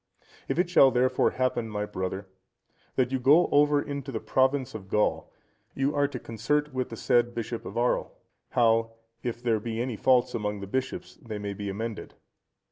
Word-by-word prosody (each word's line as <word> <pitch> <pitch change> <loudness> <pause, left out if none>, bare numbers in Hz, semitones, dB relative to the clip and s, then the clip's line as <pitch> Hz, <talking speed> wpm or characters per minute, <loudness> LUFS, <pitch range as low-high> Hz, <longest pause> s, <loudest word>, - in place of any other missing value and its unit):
If - - -1
it 180 - +2
shall 175 -6 +6
therefore 130 0 +2
happen, 125 -3 -1
my 105 -1 -2
brother, 95 0 -4 0.7
that 130 -1 +1
you 130 - 0
go 150 +7 +5
over 145 0 +4
into 140 -1 -5
the 110 - -3
province 130 +1 +1
of 100 -3 -8
Gaul, 105 +2 0 0.4
you 135 +2 0
are 145 0 +3
to 140 - -6
concert 135 +6 -1
with 130 -1 -2
the 115 - -7
said 120 +1 +2
bishop 115 0 -4
of - - -7
Arles, 120 +1 +1 0.4
how, 115 -1 +2 0.3
if 120 0 -4
there 115 -3 +2
be 115 +1 -4
any 120 -1 -2
faults 125 +1 +3
among 105 -2 -2
the 100 - -6
bishops, 130 +6 -4
they 110 -3 -6
may 100 -1 -4
be 100 0 -5
amended. 110 +3 -5
120 Hz, 185 wpm, -27 LUFS, 110-130 Hz, 0.7 s, shall